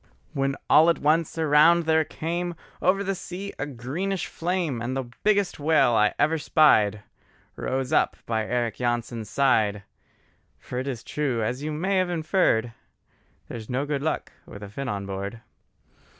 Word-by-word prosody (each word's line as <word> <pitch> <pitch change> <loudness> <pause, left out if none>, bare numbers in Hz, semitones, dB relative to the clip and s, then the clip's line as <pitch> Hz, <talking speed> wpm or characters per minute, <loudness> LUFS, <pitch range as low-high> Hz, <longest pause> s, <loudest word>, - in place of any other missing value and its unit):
When 135 0 0
all 160 +2 +6
at 165 - +2
once 160 +2 +1
around 160 +2 +5
there 160 0 +3
came 170 +3 -4 0.3
Over 195 +2 +2
the 195 0 -1
sea 190 +2 -7
a 135 - -2
greenish 150 +10 -3
flame, 170 -8 -2
And 130 +3 -2
the 125 -3 -5
biggest 205 -5 +2
whale 145 -4 +3
I 105 -1 +3
ever 155 +2 +2
spied, 110 - +4 0.5
Rose 130 +2 -2
up - - +2
by 110 -2 -1
Eric 120 -3 -1
Jansen's 120 -2 -2
side: 110 -6 +2 0.7
For 125 - -6
it 130 - -4
is 125 -4 -4
true, 130 -7 -1
as 125 +5 -2
you 155 +1 -3
may've 185 +4 0
inferred, 160 - +1 0.7
There's 110 -2 -8
no 130 +3 -1
good 145 -2 -2
luck 160 - -2 0.2
with 100 - -10
a 100 - -8
Finn 135 +6 -5
on 100 -1 -3
board. 100 +3 -5
140 Hz, 160 wpm, -25 LUFS, 120-165 Hz, 0.7 s, all